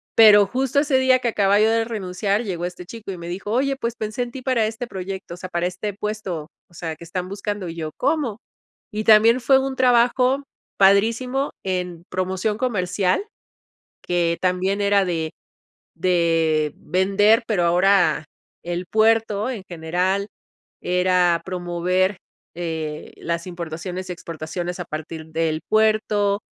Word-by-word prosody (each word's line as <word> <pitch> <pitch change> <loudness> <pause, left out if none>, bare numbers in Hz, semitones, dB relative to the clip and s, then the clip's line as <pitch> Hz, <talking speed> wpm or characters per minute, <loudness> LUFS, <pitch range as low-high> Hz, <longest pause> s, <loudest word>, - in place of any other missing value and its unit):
Pero 210 -2 +8
justo 265 +5 0
ese 285 -2 +2
día 260 0 +5
que 245 - 0
acababa 200 -2 +3
yo 220 +1 +4
de 225 0 +2
renunciar 200 -1 -1
llegó 175 -5 -3
este 180 0 -7
chico 220 +1 -8
y 185 - -6
me 170 0 -7
dijo: 190 +4 -5
"Oye, 270 +3 +1
pues 235 -3 -3
pensé 215 +2 -4
en 240 - -7
ti 265 - -8
para 245 -4 +2
este 225 +2 -5
proyecto, 190 -3 -6
o - - -15
sea, 185 +1 -7
para 175 -1 -1
este 185 +3 -4
puesto, 195 -6 -5 0.2
o - - -24
sea 160 -1 -4
que 170 - -11
están 180 +2 -4
buscando", 200 -2 -4
y 165 - -7
yo, 160 -2 -4
¿cómo? 275 -6 0 0.5
Y 215 +1 -3
también 225 +3 +6
fue 265 +2 +5
un 265 0 -2
trabajo 250 +2 +3 0.3
padrísimo 230 +8 +3
en 180 -3 -3
promoción 185 +3 -1
comercial, 200 - 0 0.8
que 170 -1 0
también 185 +2 0
era 200 -1 +3
de 165 -3 -2 0.6
de 165 -4 +1
vender 200 +5 +3
pero 200 -6 +1
ahora 180 -1 +3 0.4
el 175 +1 -3
puerto 220 +1 +2
en 230 -7 -5
general 180 +4 -1 0.5
era 180 -1 +2
promover, 180 +1 0 0.4
eh, 160 -3 -4
las 170 0 -3
importaciones 175 +2 -6
y - - -2
exportaciones 170 +2 -5
a 180 - -4
partir 155 +1 -7
del 160 0 -1
puerto, 215 -2 +2
190 Hz, 155 wpm, -22 LUFS, 175-220 Hz, 0.8 s, Pero